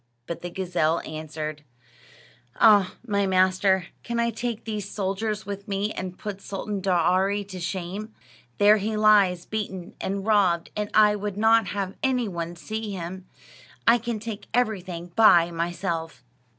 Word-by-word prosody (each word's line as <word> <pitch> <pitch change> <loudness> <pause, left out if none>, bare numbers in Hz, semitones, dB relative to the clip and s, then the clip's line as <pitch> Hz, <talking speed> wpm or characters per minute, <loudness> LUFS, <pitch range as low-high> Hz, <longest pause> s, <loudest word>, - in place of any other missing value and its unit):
But 170 - -6
the 175 - -5
gazelle 175 -3 0
answered: 155 -1 -6 0.9
"Ah, 205 -4 +5
my 200 -3 +1
master, 185 0 +3 0.2
can 235 0 -3
I 235 0 +1
take 230 0 -4
these 210 -3 -4
soldiers 210 +2 -2
with 200 0 -6
me 200 +1 -1
and 185 -3 -6
put 200 -2 -6
Sultan 200 0 -4
Daaraaee 190 +2 +2
to 185 -2 -7
shame? 190 +4 -4 0.5
There 210 +1 +6
he 215 +1 -2
lies, 200 -5 +4
beaten 190 -5 -5
and 195 0 -3
robbed, 190 -6 +2
and 210 0 -2
I 210 -1 +6
would 205 -1 -4
not 225 +1 +4
have 195 -2 -3
any 255 -3 +1
one 170 -2 -4
see 220 +3 -5
him. 185 +1 -6 0.6
I 235 +1 +6
can 235 -1 -3
take 210 -2 -7
everything 185 -7 -1
by 175 -6 +6
myself." 170 -4 -3
195 Hz, 150 wpm, -25 LUFS, 180-215 Hz, 0.9 s, There